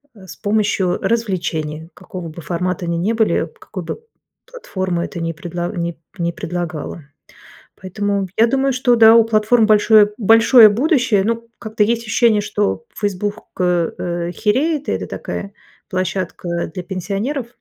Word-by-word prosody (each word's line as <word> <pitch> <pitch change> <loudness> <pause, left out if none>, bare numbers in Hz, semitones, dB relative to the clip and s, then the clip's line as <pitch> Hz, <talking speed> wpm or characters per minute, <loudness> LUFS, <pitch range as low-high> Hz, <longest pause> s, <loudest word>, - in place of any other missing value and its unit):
э, 195 -3 -14
с - - -10
помощью 205 -3 0
развлечений, 170 -8 -2
какого 180 -3 -8
бы 160 +2 -10
формата 175 +2 -2
они 170 0 -1
ни 200 +7 0
были, 220 -1 +1
какую 210 - -8
бы - - -6 0.4
платформа 185 - -3
это 175 - -7
ни 165 0 -2
предла 175 +1 -5
ни 170 -1 -3 0.2
ни 170 -1 -1
предлагала. 170 -2 -5 0.8
Поэтому, 200 +1 -2
я 230 +1 +5
думаю, 270 +1 +1
что 250 -1 +3
да, 225 -1 +7
у 230 - +7
платформ 220 +1 +3
большое 215 -1 +5
большое 225 +1 +7
будущее, 245 - +2
ну, 230 +1 -2
как-то 220 -1 0
есть 230 +2 0
ощущение, 220 -1 +2
что 205 - -2
Facebook 205 0 -2 0.2
э, 175 -2 +1
э, 175 -1 -3
хереет, 275 - 0
и - - +1
это - - -3
такая 200 0 -6 0.4
площадка 185 -3 -3
для 180 - -5
пенсионеров. 200 - -3
205 Hz, 150 wpm, -19 LUFS, 175-225 Hz, 0.8 s, да